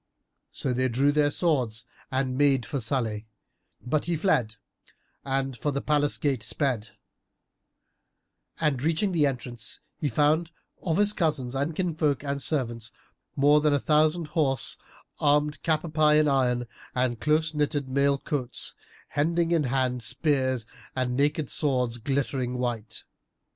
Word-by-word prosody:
So 130 - -3
they 130 +1 +1
drew 135 +4 +2
their 145 0 +3
swords 130 -9 0 0.3
and 130 -1 0
made 135 -3 +3
for 140 - -3
Salih 110 -3 -1 0.6
but 150 +4 0
he 170 0 0
fled 125 - +1 0.7
and 135 -1 -1
for 145 - -2
the 140 -1 -1
palace 145 0 +1
gate 135 -5 0
sped; 115 -1 -2 1.6
and 150 -6 +1
reaching 165 +6 +1
the 155 -5 +3
entrance, 125 -3 -4 0.2
he 150 - 0
found 150 +6 +2 0.3
of 165 -2 0
his 205 0 +3
cousins 150 -9 -1
and 140 +4 -1
kinsfolk 155 -6 0
and 140 -1 -2
servants, 120 -5 -1 0.4
more 145 +2 +5
than 150 -1 +3
a - - +1
thousand 155 +2 +2
horse 140 -5 0 0.4
armed 150 0 +2
cap 155 -2 +1
à 165 -3 -7
pie 155 -1 +4
in 155 0 +4
iron 125 -3 +2 0.3
and 125 -2 0
close 155 +1 +2
knitted 145 -2 -1
mail 140 +1 +2
coats, 130 -3 -4 0.4
hending 165 +3 +1
in 165 -4 +2
hand 125 -1 0
spears 130 -2 0 0.3
and 125 -1 -1
naked 145 +2 +1
swords 125 -5 0
glittering 130 0 -1
white. 115 -3 -3
140 Hz, 145 wpm, -27 LUFS, 125-150 Hz, 1.6 s, more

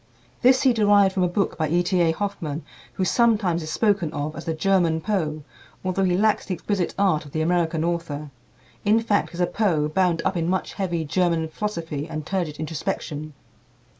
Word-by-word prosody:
This 255 +1 +5
he 260 -3 +5
derived 205 -3 +4
from 190 - 0
a 180 - +3
book 185 +1 -1
by 155 -2 0
E. 175 +2 +2
T. 180 0 +1
A. 165 -1 +4
Hoffmann, 165 -5 -4 0.3
who 190 - -1
sometimes 205 -6 +2
is 155 0 -5
spoken 200 -5 +1
of 150 +2 -3
as 165 - -7
the 165 - -1
German 175 -2 +2
Poe, 160 -6 -2 0.4
although 185 +1 +1
he 180 -1 +2
lacks 215 +1 +2
the 190 - -1
exquisite 190 0 -2
art 190 -6 +2
of 145 - -14
the 155 - 0
American 165 -1 +1
author 165 -4 -3 0.5
in 215 +2 +4
fact, 220 -3 0
is - - -7
a 175 - +4
Poe 170 -7 +1
bound 170 +1 +1
up 190 - +1
in 170 0 0
much 185 0 -1
heavy 175 -5 -2
German 170 0 +1
philosophy 165 -6 -4
and 155 -2 -5
turgid 175 -6 -2
introspection. 155 -1 -4
175 Hz, 195 wpm, -24 LUFS, 160-195 Hz, 0.5 s, This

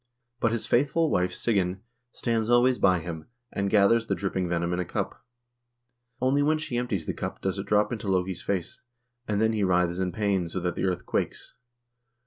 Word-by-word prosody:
But 115 - +2
his 115 -1 -2
faithful 145 +5 +2
wife, 90 0 +1
Sigyn, 95 -3 0 0.3
stands 115 -3 -1
always 120 +1 +4
by 90 -3 +4
him, 80 -2 -7 0.2
and 100 0 -1
gathers 110 +3 +4
the - - +1
drip 100 -1 -3
ping 90 -2 -1
venom 85 0 0
in 90 - -1
a - - +1
cup. 85 - -4 1.0
Only 130 +3 +2
when 155 +2 +3
she 155 -5 -4
empties 120 -9 -1
the - - -2
cup - - -5
does 95 0 -2
it 100 - -5
drop 105 +2 +3
into 110 -3 -4
Loke's 90 -1 0
face, 95 -4 -3 0.5
and 105 -1 0
then 110 +1 +3
he 105 -2 0
writhes 90 -1 +2
in 95 -1 0
pain 100 -2 0
so 90 - -4
that 90 -1 -1
the - - -2
earth 90 -1 -1
quakes. - - -3
100 Hz, 200 wpm, -27 LUFS, 90-115 Hz, 1.0 s, always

